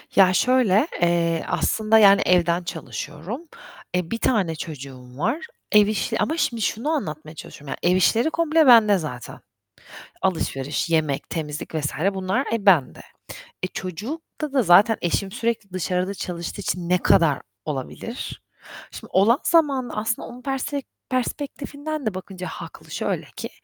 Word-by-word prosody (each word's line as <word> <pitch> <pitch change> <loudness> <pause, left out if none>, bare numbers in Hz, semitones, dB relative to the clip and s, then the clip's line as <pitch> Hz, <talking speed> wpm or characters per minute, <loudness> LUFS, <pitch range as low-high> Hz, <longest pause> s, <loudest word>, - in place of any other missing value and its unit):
Ya, 185 -2 +6
şöyle, 250 - +3
eee, 170 -1 +2
aslında 220 0 +2
yani 200 -1 +7
evden 175 -1 +3
çalışıyorum. 160 - -6 0.5
E, 180 -2 -1
1 230 - -1
tane 200 -9 +1
çocuğum 130 -5 -9
var. 230 - 0 0.3
Ev 210 -2 +6
işi 220 +1 -1
ama 320 - 0
şimdi 235 -8 0
şunu 225 +7 -1
anlatmaya 155 - -3
çalışıyorum 145 -1 -11 0.2
yani. 175 - +4
Ev - - +3
işleri 230 - +3
komple 320 -2 +2
bende 220 -5 +7
zaten. 145 -8 -7 0.8
Alışveriş, 150 -4 -1
yemek, 155 -4 0
temizlik 155 -1 -5
vs. 150 -2 -1 0.2
bunlar 190 +5 0
e, 225 -3 -2
bende. 170 -10 +4 0.6
E, - - +1
çocukta 240 - -6
da 270 -2 +3
zaten 205 +4 +6
eşim 190 +3 0
sürekli 230 -3 -2
dışarıda 185 +1 -1
çalıştığı 175 0 -5
için 175 -2 -3
ne 180 - +3
kadar 160 -4 +3 0.2
olabilir? 150 - -6 0.5
Şimdi - - -10
olan 220 +8 +4
zamanda 280 -7 +2
aslında 220 +2 -2
onun 245 +1 -11
persfe 275 +1 -2 0.3
perspektifinden 285 +2 -3
de 215 - 0
bakınca 185 0 -7
haklı. - - -10
Şöyle - - -2
ki, - - -5
195 Hz, 140 wpm, -23 LUFS, 170-240 Hz, 0.8 s, yani